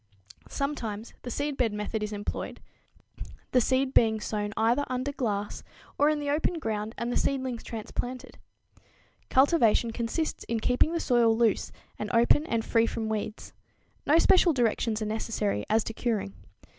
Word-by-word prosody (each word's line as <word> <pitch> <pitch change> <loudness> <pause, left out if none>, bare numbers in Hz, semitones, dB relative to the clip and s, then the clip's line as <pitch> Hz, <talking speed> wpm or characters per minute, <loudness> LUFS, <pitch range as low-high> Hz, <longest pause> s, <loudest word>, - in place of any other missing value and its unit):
Sometimes 235 -7 -4
the 245 - -6
seedbed 270 -3 -1
method 210 +1 -3
is 210 0 -3
employed, 205 -1 -5 0.9
the 250 - +4
seed 260 +2 +1
being 220 -1 +4
sown 210 -1 -3
either 235 +5 +3
under 255 +2 -2
glass 210 -7 -3 0.4
or 290 - +5
in 305 -1 +1
the 290 -1 -1
open 315 +4 0
ground 220 -5 -3
and 235 +1 -2
the - - +1
seedlings 260 -3 -1
transplanted. 245 +3 -6 0.9
Cultivation 260 -5 +4
consists 235 +8 -2
in 230 -1 -1
keeping 250 +7 +2
the 335 - 0
soil 235 -6 +3
loose 230 -3 +1 0.3
and 210 - -3
open 240 +7 +4
and 230 -1 -1
free 230 -1 +3
from 225 -1 -3
weeds. 215 0 -4 0.5
No 300 +3 +6
special 355 0 +5
directions 225 -3 0
are - - -2
necessary 215 - -2
as 220 0 +3
to 225 - -5
curing. 215 -4 -2
230 Hz, 155 wpm, -28 LUFS, 220-265 Hz, 0.9 s, No